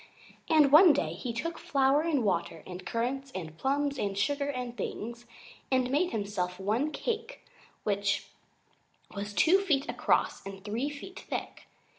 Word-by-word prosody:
And 305 -4 +5
one 320 +2 +9
day 160 - -1
he 215 +8 -4
took 320 +9 -4
flour 275 +1 +3
and 310 -6 +1
water 170 -5 -1
and 180 0 -8
currants 260 +5 -2
and 160 -4 -5
plums 280 - 0
and 200 -1 -1
sugar 285 +6 0
and 250 -3 -4
things, 235 +1 -5 0.4
and 255 -1 +2
made 330 +6 +2
himself 195 - -3
one 220 +10 0
cake 465 +6 -4 0.4
which 200 -1 0 0.9
was 205 +1 -4
two 335 - +5
feet 300 -9 +1
across - - +1
and 195 0 -9
three 230 +7 -1
feet 295 +6 -9
thick. - - -5
255 Hz, 150 wpm, -30 LUFS, 200-290 Hz, 0.9 s, one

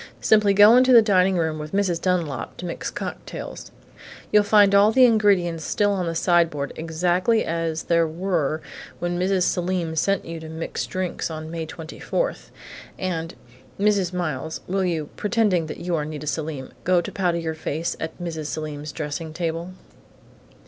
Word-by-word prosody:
Simply 210 -2 +4
go 205 +3 +8
into 255 +1 +5
the 230 -2 +9
dining 190 -3 +3
room, 160 -2 -1
with 150 +2 -7
Mrs. 190 -4 +1
Dunlap, 165 -10 -1
to 180 - -7
mix 170 - -4
cocktails. - - -7 0.6
You'll 210 - +6
find 205 -1 +5
all 200 +2 +6
the 255 +2 +6
ingredients 195 -8 +3
still 205 +4 +1
on 185 -3 -1
the 165 - -2
sideboard, 165 -5 +1
exactly 175 +7 +1
as 165 -1 -2
there 170 -1 +2
were 160 -3 -1 0.3
when 175 0 -2
Mrs. 185 0 +2
Selim 175 -2 -1
sent 195 +5 +1
you 165 0 -6
to 160 0 -9
mix 160 +1 -4
drinks 185 -2 -3
on 155 0 -6
May 165 -1 -4
24.... 165 - -3 0.6
And 165 -3 -3 0.4
Mrs. 200 -3 +2
Miles, 160 -4 -3
will 190 +1 -1
you, 165 -5 -2
pretending 205 -6 +1
that - - -6
you 175 0 -3
are 150 - -1
Nita 150 0 -6
Selim, 150 -2 -4
go 185 -1 +3
to 175 - -4
powder 180 -3 0
your 165 -1 -3
face 160 +1 -3
at 160 0 -5
Mrs. 160 -3 -4
Selim's 150 -1 -5
dressing 155 +1 -5
table?" 170 +1 -3
170 Hz, 165 wpm, -23 LUFS, 160-190 Hz, 0.6 s, the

